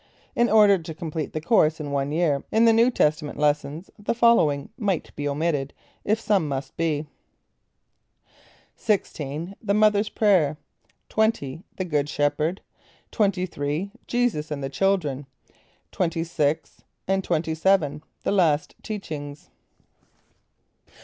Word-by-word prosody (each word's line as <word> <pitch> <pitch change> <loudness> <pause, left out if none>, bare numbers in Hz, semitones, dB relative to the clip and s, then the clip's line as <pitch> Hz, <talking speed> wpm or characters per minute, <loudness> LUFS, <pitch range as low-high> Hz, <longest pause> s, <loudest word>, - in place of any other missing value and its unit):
In 240 0 +3
order 205 -3 +6
to 160 -1 -8
complete 160 -2 -4
the 155 - -3
course 155 -2 +3
in 145 -2 -5
one 140 0 -1
year 155 -3 +1
in 225 +1 +4
the 230 - +6
New 230 +2 +5
Testament 150 - 0
lessons, 150 +3 -1
the 205 +3 -2
following 195 -13 +3
might 195 -7 -2
be 145 - -3
omitted, 145 -1 -1 0.3
if 215 +2 +1
some 200 -7 +1
must 135 -1 -4
be. 155 -2 -1 1.7
XVI 165 -4 -2
The 205 -2 0
Mothers 210 0 +3
Prayer; 180 -9 +2 0.5
XX 195 -10 0 0.2
The 185 - -2
Good 145 -4 0
Shepherd; 150 +5 0 0.5
XXIII 185 - -1 0.2
Jesus 240 -11 0
and 145 -2 -4
the 135 - -2
Children; 145 -5 0 0.7
XXVI, 165 -3 -1 0.3
XXVII 170 -3 +1 0.2
The - - 0
Last 160 -7 +2
Teachings. 150 -9 -7
165 Hz, 115 wpm, -24 LUFS, 145-200 Hz, 1.7 s, order